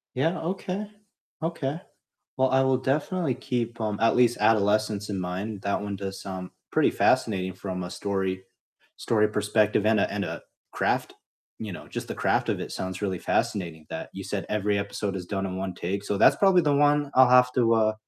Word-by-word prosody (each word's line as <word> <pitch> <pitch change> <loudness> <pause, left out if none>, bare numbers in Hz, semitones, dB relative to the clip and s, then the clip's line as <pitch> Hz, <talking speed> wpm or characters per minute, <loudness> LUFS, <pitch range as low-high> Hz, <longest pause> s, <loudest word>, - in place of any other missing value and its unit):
Yeah, 160 +7 +1
okay, 190 +4 -3 0.5
okay. 160 -1 -2 0.6
Well, 130 0 +2
I 130 0 +4
will 130 -1 +3
definitely 145 +3 0
keep, 120 -3 -3
um, 105 -2 -1
at 115 - +4
least 120 -1 +4
Adolescence 105 -1 +2
in 100 -2 -3
mind, 95 +3 -4
that 100 - 0
one 100 -1 -4
does 95 0 -6
sound 95 -2 -6 0.2
pretty - - +3
fascinating 95 -3 +1
from 95 -1 -5
a 90 - -6
story 95 -2 -2 0.6
story 105 -2 +2
perspective 105 0 +1
and 110 -1 +4
a - - +1
and 100 0 -2
a - - -5 0.3
craft. - - 0 0.5
You 105 -4 -5
know, - - -10
just - - -5
the - - -5
craft - - +1
of - - 0
it - - -6
sounds 95 +1 -5
really 95 -3 -2
fascinating, 85 -5 -1
that - - -6
you 95 - -6
said 100 0 -3
every 105 -1 0
episode 100 0 -3
is 90 - -6
done 95 0 -2
in 95 0 -4
1 95 -1 -3
take. 100 +3 -4
So 100 - -1
that's - - +6
probably 190 -3 +5
the 145 -2 +2
one 145 0 +3
I'll 130 -1 +7
have 125 0 +6
to, 115 -2 +3
uh, 110 -1 +3
105 Hz, 195 wpm, -26 LUFS, 95-130 Hz, 0.6 s, I'll